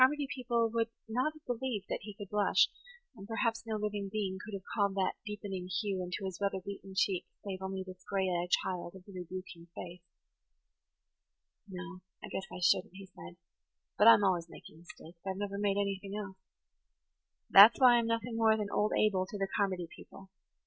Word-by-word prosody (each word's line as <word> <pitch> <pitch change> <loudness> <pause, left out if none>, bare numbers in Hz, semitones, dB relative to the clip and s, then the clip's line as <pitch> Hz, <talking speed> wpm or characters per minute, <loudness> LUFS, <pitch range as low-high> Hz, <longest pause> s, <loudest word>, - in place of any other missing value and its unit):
Carmody 290 +3 +5
people 235 -3 0
would 230 0 +1 0.2
not 250 +7 0
have 310 - -17
believed 245 -4 -2 0.2
he 210 0 -9
could 200 -1 -9
blush; 210 -1 +4 0.5
and 195 - -11
perhaps 230 0 -1
no 220 - -1
living 205 -2 -2
being 195 -3 -2
could 210 -1 -6
have 190 - -7
called 200 -3 +1
that 190 -1 +1
deep 210 0 -6
[Page 200 - -5
84] 190 -1 -3
ening 180 - -9
hue 200 -3 -1
into 185 +2 -4
his 190 -2 -5
weather 195 -1 0
beaten 195 0 -8
cheek 190 -2 +1 0.2
save 190 -2 -5
only 190 0 -3
this 185 0 -11
gray 195 -1 0
eyed 175 -1 -1
child 180 -1 -1
of 190 - -12
the 200 - -13
rebuking 180 -1 -8
face. 180 -3 -8 1.7
"No, 185 -1 -8 0.2
I - - -6
guess 195 - -4
I 185 - -6
shouldn't," 180 +1 +2
he 195 0 -9
said. 85 0 -10 0.6
"But 210 - +5
I'm 230 -2 +9
always 175 -3 +1
making 160 - -13
mistakes. 170 0 -14
I've 190 -1 -3
never 200 0 -3
made 200 -1 +1
anything 200 0 -2
else. 200 -2 -6 1.1
That's 205 +4 +10
why 250 -2 +7
I'm 235 -1 +1
nothing 230 0 -1
more 220 -1 +4
than 210 -2 -3
'Old 210 +1 +1
Abel' 190 -3 +2
to 205 - -6
the 195 -1 -1
Carmody 190 -4 0
people. 190 -1 -14
195 Hz, 195 wpm, -32 LUFS, 185-215 Hz, 1.7 s, That's